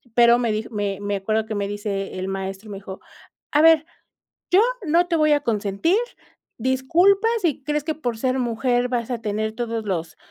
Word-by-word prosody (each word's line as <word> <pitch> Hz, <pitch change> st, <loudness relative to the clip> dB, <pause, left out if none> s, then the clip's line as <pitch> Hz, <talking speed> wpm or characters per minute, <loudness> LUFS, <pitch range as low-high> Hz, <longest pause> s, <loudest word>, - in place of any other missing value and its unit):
pero, 235 Hz, 0 st, +6 dB
me 235 Hz, -2 st, 0 dB
dij 215 Hz, +1 st, -3 dB
me 205 Hz, -3 st, -3 dB
me 205 Hz, 0 st, -2 dB
acuerdo 215 Hz, +3 st, -1 dB
que 220 Hz, -, -5 dB
me 200 Hz, -1 st, -1 dB
dice 200 Hz, -2 st, -4 dB
el 185 Hz, -, -3 dB
maestro, 195 Hz, +2 st, -5 dB
y -, -, -9 dB
me 200 Hz, -, -6 dB
dijo: 195 Hz, -1 st, -9 dB, 0.5 s
"A 295 Hz, -, +4 dB
ver, 320 Hz, -1 st, +6 dB, 0.7 s
yo 370 Hz, +3 st, +6 dB, 0.2 s
no 340 Hz, +3 st, +3 dB
te 345 Hz, -, 0 dB
voy 305 Hz, -1 st, +3 dB
a 295 Hz, -, +3 dB
consentir, 215 Hz, -, 0 dB, 0.6 s
disculpa 330 Hz, -, +3 dB
si 310 Hz, -6 st, -1 dB
crees 300 Hz, +1 st, -1 dB
que 315 Hz, 0 st, -2 dB
por 245 Hz, -7 st, -3 dB
ser 255 Hz, +1 st, 0 dB
mujer 245 Hz, +1 st, 0 dB
vas 240 Hz, -2 st, -2 dB
a 240 Hz, -, -2 dB
tener 215 Hz, 0 st, -2 dB
todos 230 Hz, -1 st, -3 dB
los 165 Hz, -5 st, -3 dB
230 Hz, 200 wpm, -22 LUFS, 205-290 Hz, 0.7 s, pero